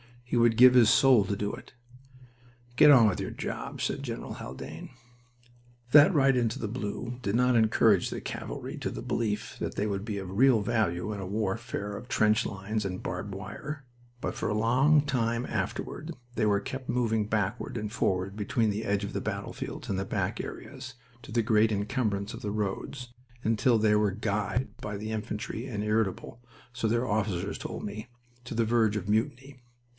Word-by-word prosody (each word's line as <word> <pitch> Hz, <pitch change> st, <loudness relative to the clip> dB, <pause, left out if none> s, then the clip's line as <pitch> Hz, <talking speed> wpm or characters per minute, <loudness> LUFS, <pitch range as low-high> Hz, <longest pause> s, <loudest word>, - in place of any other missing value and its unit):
He 120 Hz, -, -3 dB
would 115 Hz, -1 st, +4 dB
give 125 Hz, +1 st, +9 dB
his 120 Hz, -4 st, +6 dB
soul 125 Hz, -6 st, +6 dB
to 100 Hz, -, -1 dB
do 105 Hz, +1 st, -2 dB
it. -, -, -10 dB, 1.0 s
"Get 150 Hz, -, +8 dB
on 125 Hz, -6 st, +8 dB
with 95 Hz, -, 0 dB
your -, -, -3 dB
job," -, -, -5 dB
said -, -, -1 dB
General -, -, -5 dB
Haldane. 65 Hz, +5 st, -8 dB, 1.0 s
That 150 Hz, +7 st, +8 dB
ride 135 Hz, -3 st, +4 dB
into 115 Hz, -2 st, 0 dB
the 110 Hz, -, -3 dB
blue 120 Hz, +2 st, -4 dB
did 100 Hz, -2 st, -1 dB
not 125 Hz, 0 st, +3 dB
encourage 110 Hz, -1 st, +4 dB
the -, -, -5 dB
cavalry -, -, -6 dB
to -, -, -3 dB
the -, -, -6 dB
belief 105 Hz, -3 st, -2 dB
that -, -, -3 dB
they 100 Hz, -, 0 dB
would 100 Hz, -1 st, -2 dB
be 105 Hz, -3 st, -3 dB
of 95 Hz, -2 st, -5 dB
real 120 Hz, +2 st, +4 dB
value 105 Hz, -4 st, 0 dB
in 100 Hz, -, -6 dB
a 95 Hz, -, -5 dB
warfare 105 Hz, +1 st, -3 dB
of -, -, -10 dB
trench 110 Hz, -2 st, +3 dB
lines 100 Hz, +3 st, -3 dB
and 95 Hz, -1 st, -4 dB
barbed 95 Hz, +2 st, -4 dB
wire, 140 Hz, +8 st, -7 dB, 0.4 s
but -, -, -2 dB
for -, -, -3 dB
a 105 Hz, -, 0 dB
long 130 Hz, +7 st, +4 dB
time 120 Hz, -4 st, 0 dB
later 155 Hz, -, -3 dB, 0.3 s
they 110 Hz, -, +1 dB
were 100 Hz, -1 st, +2 dB
kept 130 Hz, +4 st, -6 dB
moving 110 Hz, -4 st, +1 dB
backward 105 Hz, +3 st, -1 dB
and 105 Hz, -1 st, -4 dB
forward 95 Hz, -2 st, -1 dB
between 110 Hz, +2 st, +1 dB
the 105 Hz, +2 st, -2 dB
edge 100 Hz, 0 st, 0 dB
of 100 Hz, -, -5 dB
the -, -, -2 dB
battlefields -, -, -5 dB
and 95 Hz, -, 0 dB
the 95 Hz, -, -2 dB
back -, -, -2 dB
areas, 130 Hz, -1 st, -8 dB, 0.3 s
to -, -, -11 dB
the 115 Hz, -1 st, +2 dB
great 110 Hz, 0 st, +3 dB
incumbrance 100 Hz, -1 st, -1 dB
of -, -, -8 dB
the 105 Hz, -, -3 dB
roads, 110 Hz, +5 st, -4 dB, 0.3 s
until 115 Hz, +2 st, +3 dB
they 105 Hz, -1 st, +3 dB
were 105 Hz, -1 st, +3 dB
"guyed" 105 Hz, +4 st, -1 dB
by 105 Hz, -1 st, -5 dB
the 110 Hz, +2 st, -5 dB
infantry, 110 Hz, +2 st, -4 dB
and 105 Hz, -5 st, -3 dB
irritable, 105 Hz, +2 st, -1 dB, 0.3 s
so 120 Hz, -2 st, -1 dB
their 120 Hz, +3 st, +1 dB
officers 100 Hz, -3 st, -1 dB
told -, -, -6 dB
me, 105 Hz, +3 st, -6 dB, 0.4 s
to 120 Hz, -, -6 dB
the 115 Hz, 0 st, +2 dB
verge 110 Hz, -2 st, +2 dB
of 100 Hz, -1 st, -3 dB
mutiny. 130 Hz, +4 st, -1 dB
110 Hz, 190 wpm, -29 LUFS, 100-120 Hz, 1.0 s, give